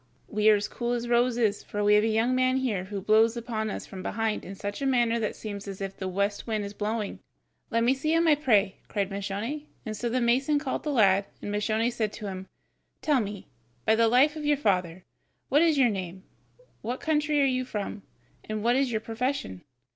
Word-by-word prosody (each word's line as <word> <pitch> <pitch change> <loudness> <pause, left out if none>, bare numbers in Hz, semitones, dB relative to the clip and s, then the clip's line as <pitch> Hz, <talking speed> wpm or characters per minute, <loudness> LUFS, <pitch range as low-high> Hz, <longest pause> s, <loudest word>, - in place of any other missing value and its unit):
we 215 -1 +3
are 215 - +7
as 205 0 -1
cool 240 +2 -3
as 240 0 -2
roses, 235 -3 +2
for 205 0 -3
we 205 0 +5
have 210 0 +5
a - - +2
young 225 +3 +2
man 255 0 +2
here 220 -9 -1
who 200 +1 -5
blows 220 +4 +3
upon 225 -2 -3
us - - -5
from 190 - -8
behind 220 +2 -2
in 195 - -8
such 205 +5 -5
a - - -1
manner 240 -3 +2
that 215 -2 0
it - - -11
seems 205 -2 -7
as 195 -1 -6
if 195 -1 -5
the 190 - -5
west 200 +4 -1
wind 215 -2 -1
were 200 - -4
blowing." 210 0 -3 0.5
"Let 230 -1 +1
me 245 +3 +4
see 275 +4 -1
him, 335 0 +3
I 310 - +7
pray," 215 -10 +2
cried 200 -2 -2
Moscione, 205 +10 -4 0.2
and 215 -1 -4
so 235 +3 -2
the 255 +2 0
mason 260 +5 +2
called 275 -2 -2
the 300 - -2
lad, 200 -6 +4
and 205 - -5
Moscione 220 +3 0
said 220 -3 -1
to 215 - -7
him: 190 -1 -6 0.6
"Tell 295 -4 +3
me, 205 -2 -6 0.4
by 220 - +4
the 230 +1 +4
life 265 +6 +4
of 310 - -6
your 295 -1 +2
father, 180 -7 0 0.5
what 290 +3 +4
is 325 -3 +4
your 255 -3 +5
name, 190 -1 -5 0.6
what 245 +4 -3
country 300 -1 +1
are 280 - +4
you 255 -1 +1
from, 210 -3 -5 0.4
and 215 -1 -4
what 240 +2 +3
is 270 -1 +1
your 220 -1 -1
profession?" 225 - -3
225 Hz, 225 wpm, -27 LUFS, 205-255 Hz, 0.6 s, are